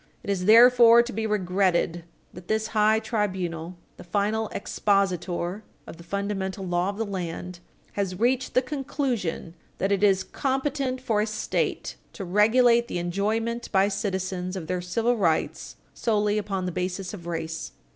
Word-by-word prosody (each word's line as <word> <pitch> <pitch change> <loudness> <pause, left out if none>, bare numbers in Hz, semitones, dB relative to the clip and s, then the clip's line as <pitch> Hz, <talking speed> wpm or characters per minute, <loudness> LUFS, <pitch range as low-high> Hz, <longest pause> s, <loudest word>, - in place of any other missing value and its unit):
It 200 - -2
is 185 -2 -1
therefore 235 +1 +8
to 245 - -7
be 220 +2 -2
regretted 180 -4 0 0.3
that 180 0 -12
this 220 0 0
high 215 0 +4
tribunal, 185 -6 -3 0.2
the - - -10
final 210 +4 0
expositor 190 -2 -1 0.2
of - - -10
the 170 - -12
fundamental 195 +1 -3
law 175 +1 0
of 200 - -5
the 225 - -1
land, 180 -2 -5 0.3
has 195 -3 -3
reached 250 +2 +1
the 255 - +4
conclusion 255 - -3 0.2
that 195 - -1
it 200 -1 +1
is 195 -2 +4
competent 270 -1 -2
for 220 -4 +1
a 215 - 0
State 215 - -2 0.2
to 195 - -6
regulate 235 +5 +4
the - - -4
enjoyment 215 +7 -2
by 195 0 +3
citizens 190 -2 -3
of 180 -4 -5
their 180 +2 -2
civil 225 +7 0
rights 165 -6 -1 0.2
solely 210 -2 +1
upon 195 -3 -3
the 180 - -2
basis 180 +2 -3
of 170 -4 -9
race. 165 -1 -4
200 Hz, 155 wpm, -25 LUFS, 180-225 Hz, 0.3 s, therefore